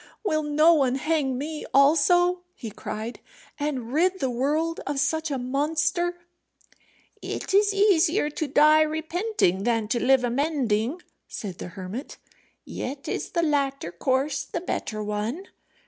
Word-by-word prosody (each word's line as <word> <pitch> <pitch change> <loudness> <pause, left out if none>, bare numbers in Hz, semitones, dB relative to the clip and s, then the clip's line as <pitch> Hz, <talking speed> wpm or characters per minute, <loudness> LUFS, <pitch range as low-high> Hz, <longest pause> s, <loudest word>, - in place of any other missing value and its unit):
"Will 310 -7 +1
no 305 +2 +4
one 270 -5 +2
hang 280 -2 0
me 300 +3 -5
also," 350 +6 +4
he 225 - -7
cried, 220 +3 -6 0.4
"and 265 -5 -3
rid 365 +5 +2
the 265 -3 -1
world 300 +7 0
of 285 -1 -1
such 315 +2 0
a 275 - -1
monster?" 310 +7 0 1.0
"It - - -5
is 405 +1 +4
easier 375 -5 +3
to 310 +1 -3
die 305 +3 +5
repenting 315 - 0
than 225 0 0
to 235 +1 0
live 260 0 +4
amending," 255 +1 0 0.2
said 190 -5 -7
the - - -5
hermit; 195 +9 -6 0.5
"yet 275 +2 -6
is - - -3
the 340 - 0
latter 275 - 0
course 265 - 0
the 335 +5 -5
better 215 -11 -3
one. 215 - -3
290 Hz, 140 wpm, -25 LUFS, 250-325 Hz, 1.0 s, die